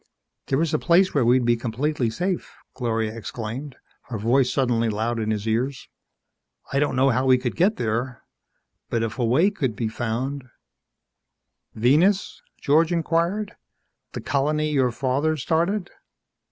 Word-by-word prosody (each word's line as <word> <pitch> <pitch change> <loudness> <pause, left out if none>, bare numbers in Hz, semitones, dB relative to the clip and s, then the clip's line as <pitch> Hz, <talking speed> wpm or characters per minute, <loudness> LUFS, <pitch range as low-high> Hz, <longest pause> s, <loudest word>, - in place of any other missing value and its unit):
"There 135 +4 +1
is 160 - -2
a 155 - +2
place 180 +2 +3
where 140 - +2
we'd 120 +1 +3
be 120 0 +4
completely 125 +3 -1
safe," 180 +10 -3 0.2
Gloria 115 -3 -2
exclaimed, 115 +5 -6 0.3
her 115 - -3
voice 125 +4 +2
suddenly 120 -4 +1
loud 115 +2 -1
in 110 -1 -2
his 105 0 -2
ears. 125 +4 -1 0.8
"I 140 - +2
don't 145 -2 0
know 135 +1 +4
how 130 +2 0
we 130 -1 +6
could 125 -1 -3
get 195 +5 +3
there. 120 +2 -3 0.7
But 115 -1 0
if 115 +3 -4
a - - +1
way 160 - +3
could 135 - -2
be 115 -1 -2
found 125 +4 -3 0.7
" - - -52
"Venus?" 155 - +2 0.2
George 160 +3 +3
inquired. 170 +5 0 0.6
"The - - -5
colony 150 +3 0
your 135 -4 +2
father 140 +6 0
started?" 175 +6 0
130 Hz, 155 wpm, -24 LUFS, 115-155 Hz, 0.8 s, we